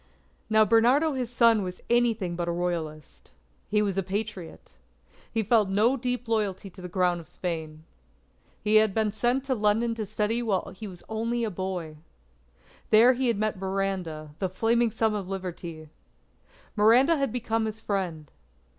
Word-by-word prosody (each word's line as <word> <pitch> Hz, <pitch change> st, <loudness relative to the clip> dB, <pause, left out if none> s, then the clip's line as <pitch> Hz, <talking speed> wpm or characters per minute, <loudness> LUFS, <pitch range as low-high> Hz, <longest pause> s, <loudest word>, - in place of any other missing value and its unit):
Now, 220 Hz, 0 st, +5 dB
Bernardo 250 Hz, +8 st, +4 dB
his 255 Hz, -3 st, -3 dB
son 230 Hz, -2 st, +4 dB
was 180 Hz, -1 st, -6 dB
anything 230 Hz, -7 st, +1 dB
but 170 Hz, 0 st, -3 dB
a -, -, 0 dB
Royalist. 170 Hz, -4 st, -4 dB, 0.3 s
He 210 Hz, 0 st, +2 dB
was 195 Hz, -2 st, -1 dB
a -, -, +2 dB
Patriot. 195 Hz, -2 st, -5 dB, 0.6 s
He 225 Hz, -, 0 dB
felt 215 Hz, -1 st, +3 dB
no 215 Hz, +7 st, +3 dB
deep 250 Hz, -1 st, -3 dB
loyalty 205 Hz, -4 st, -1 dB
to 185 Hz, -, -13 dB
the 180 Hz, -, -7 dB
Crown 180 Hz, -1 st, +1 dB
of 165 Hz, -, -12 dB
Spain. 160 Hz, -3 st, -5 dB, 0.8 s
He 215 Hz, +1 st, +5 dB
had 215 Hz, -2 st, +3 dB
been 220 Hz, -1 st, +2 dB
sent 240 Hz, +5 st, 0 dB
to 270 Hz, -1 st, -1 dB
London 220 Hz, +1 st, +1 dB
to 220 Hz, -2 st, -5 dB
study 215 Hz, +3 st, -1 dB
while 205 Hz, -6 st, -1 dB
he 215 Hz, +2 st, -7 dB
was 180 Hz, -3 st, -10 dB
only 230 Hz, +2 st, -2 dB
a 220 Hz, -, -1 dB
boy. 180 Hz, -4 st, -4 dB, 0.9 s
There 230 Hz, +4 st, +7 dB
he 255 Hz, +1 st, -1 dB
had 230 Hz, -3 st, +1 dB
met 215 Hz, -2 st, -1 dB
Miranda 190 Hz, -5 st, -3 dB
the 190 Hz, -, -1 dB
Flaming 230 Hz, +5 st, +2 dB
Son 220 Hz, 0 st, 0 dB
of 200 Hz, -3 st, -4 dB
Liberty. 175 Hz, -4 st, -6 dB, 0.9 s
Miranda 240 Hz, +9 st, +5 dB
had 275 Hz, -4 st, 0 dB
become 225 Hz, -2 st, -1 dB
his 215 Hz, 0 st, -6 dB
friend. 175 Hz, -9 st, -3 dB
210 Hz, 165 wpm, -27 LUFS, 185-230 Hz, 0.9 s, There